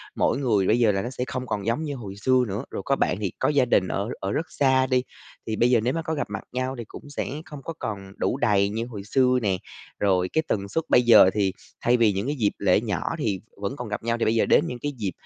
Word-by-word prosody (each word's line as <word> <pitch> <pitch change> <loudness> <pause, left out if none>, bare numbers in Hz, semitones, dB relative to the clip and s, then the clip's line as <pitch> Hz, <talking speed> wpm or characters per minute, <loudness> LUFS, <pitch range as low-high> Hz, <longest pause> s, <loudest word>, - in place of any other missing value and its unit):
mỗi - - +1
người 110 -9 +1
bây 115 - +3
giờ 115 -3 +4
là 95 -1 -1
nó 120 - -4
sẽ 125 -1 -4
không 130 -2 -4
còn 100 -4 -3
giống 115 +7 0
như 145 -2 -3
hồi 105 -6 -8
xưa 125 +5 +2
nữa. 105 +4 -3
Rồi - - -4
có 135 - +2
bạn 90 - 0
thì 100 -4 -1
có - - +2
gia 145 -3 +3
đình 95 -6 +2
ở 100 +4 -2
ở 95 - -3
rất 160 - -1
xa 130 -2 +3
đi, 125 -1 +2 0.4
thì 110 - -1
bây 120 +3 +3
giờ 120 - +5
nếu 125 +3 +1
mà 165 - -1
có 160 -1 -3
gặp 145 - -2
mặt 100 -1 -5
nhau 130 +1 -2
thì 120 - -5
cũng 145 - -11
sẽ 145 - -3 0.2
không 150 -3 -9
có 165 - -5
còn 100 -3 -5
đủ - - 0
đầy 100 -6 +2
như 110 +3 -3
hồi 110 -5 -8
xưa 125 +4 +2
nè, 100 -4 +1 0.4
rồi 90 -2 +2
cái 160 - +2
tần 100 -1 -1
suất 160 +10 -1
bây 125 - +6
giờ 110 -6 +7
thì, 100 -3 +1 0.3
thay 120 +1 +3
vì 115 -3 +4
những 100 +5 -2
cái 145 - -1
dịp 110 -7 +1
lễ 100 0 +3
nhỏ 105 -9 -2 0.2
thì 105 - -1 0.2
vẫn 105 +7 -2
còn - - -5
gặp 105 0 -4
nhau 115 0 0
thì 115 - 0
bây 110 - +2
giờ 115 - +3
đến - - +4
những 125 - -5
cái 145 - -2
dịp, 100 -5 -2
115 Hz, 285 wpm, -25 LUFS, 100-130 Hz, 0.4 s, giờ